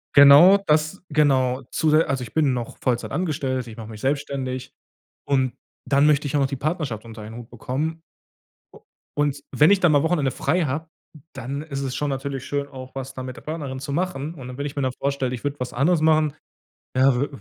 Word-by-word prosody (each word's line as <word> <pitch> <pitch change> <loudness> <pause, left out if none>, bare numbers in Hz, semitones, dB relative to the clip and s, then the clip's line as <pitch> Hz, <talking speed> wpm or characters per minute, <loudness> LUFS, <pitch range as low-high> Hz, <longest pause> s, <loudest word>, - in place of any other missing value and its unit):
Genau 145 +8 +9
das 160 -1 0
genau, 135 -4 +2
zusä 155 +1 +3
also, 135 -2 -1
ich 115 - -10
bin 150 -4 +2
noch 120 -2 -5
Vollzeit 120 -2 -1
angestellt, 140 -6 -2
ich 110 0 -10
mache 110 -1 -8
mich 110 -1 -9
selbstständig 135 -2 -2 0.5
und 130 -3 +1 0.3
dann 140 +1 +3
möchte 150 -1 +3
ich 140 - -3
auch - - +3
noch 135 - +3
die 135 - -4
Partnerschaft 140 - -3
unter 110 -1 -10
einen 110 +1 -9
Hut 120 -1 -9
bekommen. 150 +7 -3 0.7
U - - -14 0.4
und 145 -1 0
wenn 150 +5 +5
ich 200 - +5
dann 175 -4 +4
mal 145 -1 +4
Wochenende 160 -5 +1
frei 175 +6 0
habe, 155 +4 -3 0.4
dann 135 +5 -5
ist 140 -3 -5
es 130 -2 -3
schon 145 +1 -1
natürlich 135 -1 -4
schön, 140 0 -2
auch 130 -2 -10
was 135 0 -5
da 130 - -6
mit 130 -1 -6
der - - -10
Partnerin 145 -4 -5
zu 140 +1 -6
machen. 165 -1 -2
Und 125 -3 -8
wenn 145 - -3
ich 145 - -5
mir 140 - -1
dann 130 - +1
vorstelle, 135 -2 -1
ich 120 - -6
würde 145 0 -3
was 125 -1 -4
anderes 155 +6 +2
machen, 155 -2 +3 0.6
ja, 130 -1 +4
w 140 - +1
140 Hz, 215 wpm, -23 LUFS, 130-150 Hz, 0.7 s, Genau